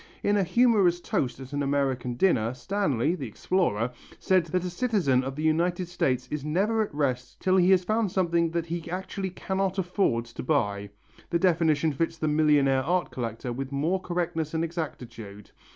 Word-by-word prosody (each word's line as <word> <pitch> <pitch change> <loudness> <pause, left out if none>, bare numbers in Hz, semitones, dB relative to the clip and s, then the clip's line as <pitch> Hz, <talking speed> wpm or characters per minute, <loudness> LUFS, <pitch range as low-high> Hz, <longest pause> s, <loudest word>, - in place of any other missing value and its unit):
In 205 - +2
a 200 - +3
humorous 195 -3 +3
toast 125 -7 -2
at 135 +1 -10
an 145 - -1
American 135 -3 0
dinner, 120 - +2
Stanley, 150 - 0
the 145 -8 -5
explorer, 120 - 0 0.3
said 185 -3 +2
that 180 +2 -1
a - - -2
citizen 175 - +1
of 135 +1 -4
the 155 - -4
United 170 +3 +1
States 130 -7 0
is 150 -2 -3
never 200 +9 +1
at 215 - -2
rest 130 -4 -2
till 185 0 +2
he 180 0 +4
has 185 -1 +5
found 215 +1 0
something 170 -3 +1
that 170 0 -2
he 170 0 -5
actually 190 +2 -4
cannot 190 +1 -2
afford 175 - 0
to 120 - -8
buy. 100 -8 0 0.4
The 170 - +2
definition 160 -4 +2
fits 165 +3 -1
the 155 - -1
millionaire 150 -3 +3
art 175 0 0
collector 120 0 -4
with 135 +2 -5
more 160 +7 0
correctness 170 -3 -2
and 160 - +1
exactitude. 115 - -6
160 Hz, 180 wpm, -27 LUFS, 130-185 Hz, 0.4 s, has